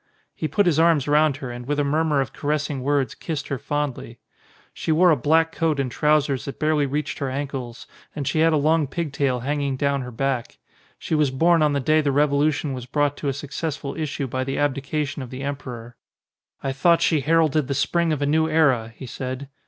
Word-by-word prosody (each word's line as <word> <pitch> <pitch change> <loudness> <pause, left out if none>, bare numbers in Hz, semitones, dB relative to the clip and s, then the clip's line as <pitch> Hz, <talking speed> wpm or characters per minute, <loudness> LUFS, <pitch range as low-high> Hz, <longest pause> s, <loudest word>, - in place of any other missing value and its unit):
He 155 - -3
put 205 +5 +1
his 165 -3 +2
arms 165 -4 +3
round 150 -1 +3
her 130 -3 -6
and 120 0 -8
with 145 0 -1
a - - +2
murmur 150 0 +1
of 135 - -4
caressing 150 -2 -2
words 140 -2 0
kissed 155 -4 -5
her 140 - -2
fondly. 145 -5 -3 0.6
She - - -2
wore 175 +3 +5
a - - +5
black 160 +5 +2
coat 160 -3 0
and 130 -3 -1
trousers 150 -2 +1
that 140 - -6
barely 155 -2 +2
reached 145 +2 -3
her 140 - -2
ankles, 130 -3 -5 0.3
and 145 -3 -4
she 145 +3 0
had 165 +1 +4
a 155 - +3
long 155 +1 +2
pig 155 +1 -4
tail 130 -3 0
hanging 140 0 -1
down 140 0 0
her 125 - -6
back. 125 0 -2 0.4
She - - -5
was 150 -3 +3
born 165 +5 +3
on 150 -1 +3
the 140 - +1
day 155 +4 +3
the 145 - 0
revolu 145 +1 +3
tion 145 -1 -3
was 125 -1 -7
brought 145 +1 +1
to 145 - -4
a - - +2
successful 145 0 -5
issue 150 -3 -3
by 130 0 -2
the 135 +1 -3
abdi 145 -1 0
cation 145 0 -3
of 130 - -7
the 130 +2 -7
emperor. 125 -4 -6 0.7
"I 135 - -1
thought 165 +5 +3
she 155 -4 +2
heralded 155 -1 +2
the 140 - -2
Spring 170 +4 +1
of 145 -2 -1
a - - +2
new 160 +2 +2
era," 135 -8 +2
he - - -8
said. 130 +2 -6
145 Hz, 225 wpm, -23 LUFS, 135-155 Hz, 0.7 s, wore